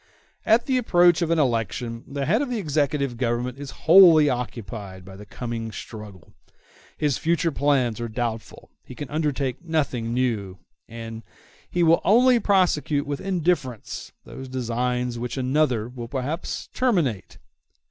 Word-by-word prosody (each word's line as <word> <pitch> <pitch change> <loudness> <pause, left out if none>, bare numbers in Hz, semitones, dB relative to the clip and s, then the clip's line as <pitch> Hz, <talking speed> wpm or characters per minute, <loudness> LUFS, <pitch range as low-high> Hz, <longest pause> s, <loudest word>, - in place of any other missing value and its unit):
At 225 +2 +4
the 260 -2 +1
approach 175 -6 +4
of 170 - 0
an 165 - +2
election 115 -3 -1
the 140 0 -3
head 215 - +2
of 285 - -2
the 245 - -2
executive 145 - -1
government 125 +1 -2
is 145 -1 -7 0.2
wholly 165 -4 +8
occupied 105 -6 -6
by 95 0 -11
the 105 +1 -12
coming 115 0 -5
struggle; 105 -5 -10 0.6
his 145 -3 0
future 165 0 +1
plans 130 -6 +1
are 120 - -2
doubtful; 115 -1 -5
he 125 - -11
can 145 +1 -7
undertake 145 -3 -2
nothing 140 -8 -1
new, 115 -7 -1 0.3
and 115 -1 -7
the - - -34 0.4
he 175 - +1
will 165 0 +4
only 245 +4 +5
prosecute 175 -8 +1
with 145 -1 -4
indifference 170 - -2
those 135 - -9
designs 125 -1 -2
which 120 +2 -4
another 130 -4 +1
will 120 -1 -8
perhaps 140 +7 -4
terminate. 165 - 0
130 Hz, 145 wpm, -24 LUFS, 115-160 Hz, 0.6 s, wholly